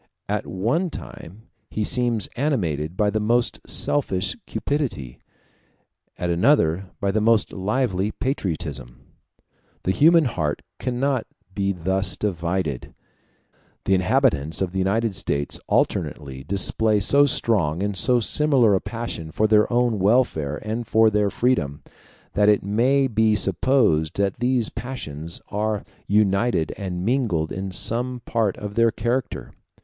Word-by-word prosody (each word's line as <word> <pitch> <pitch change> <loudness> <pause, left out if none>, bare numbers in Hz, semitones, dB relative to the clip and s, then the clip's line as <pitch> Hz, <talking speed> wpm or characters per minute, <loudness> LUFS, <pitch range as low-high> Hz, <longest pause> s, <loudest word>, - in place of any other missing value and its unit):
At - - -2
one 120 - -1
time 105 - -10 0.3
he 110 - -2
seems 120 -1 +1
animated 90 - -1
by 105 -1 +2
the 110 - -1
most 120 +3 +1
selfish 100 -11 0
cupidity, 125 - -3 1.0
at 90 -1 -2
another 90 - +2
by 100 -2 0
the 110 +2 0
most 115 -1 +2
lively 100 -1 -1
patriotism. 80 - -4 0.8
The 95 - +1
human 165 - +5
heart 80 - -2 0.2
cannot 130 0 -1 0.3
be 100 -1 0
thus 95 +2 -1
divided. 85 -7 -3 0.9
The 95 - +1
inhabitants 95 - +1
of 95 -2 -1
the 95 - -3
United 100 +2 0
States 70 -3 -2
alternately 65 -3 -1
display 105 +4 +2
so 140 +7 +4
strong 95 - +2
and 100 -1 -2
so 125 +6 +3
similar 130 -2 +3
a 95 - +1
passion 115 -9 -5
for 110 - 0
their 105 +1 +3
own 120 -3 +1
welfare 95 - +1
and 110 +2 -4
for 110 -1 +4
their 105 -1 +1
freedom, 90 - -1 0.5
that 105 0 +3
it 105 - +3
may 125 +7 +2
be 110 -2 +2
supposed 105 - +2
that 100 +2 -1
these 125 -2 +1
passions 85 - -6
are 105 0 -2 0.2
united 100 -3 +1
and 90 -2 -4
mingled 110 -11 0
in 95 0 -4
some 120 +6 -2
part 110 -4 0
of 105 -1 -6
their 115 +1 +3
character. 120 +1 -3
105 Hz, 135 wpm, -23 LUFS, 90-120 Hz, 1.0 s, human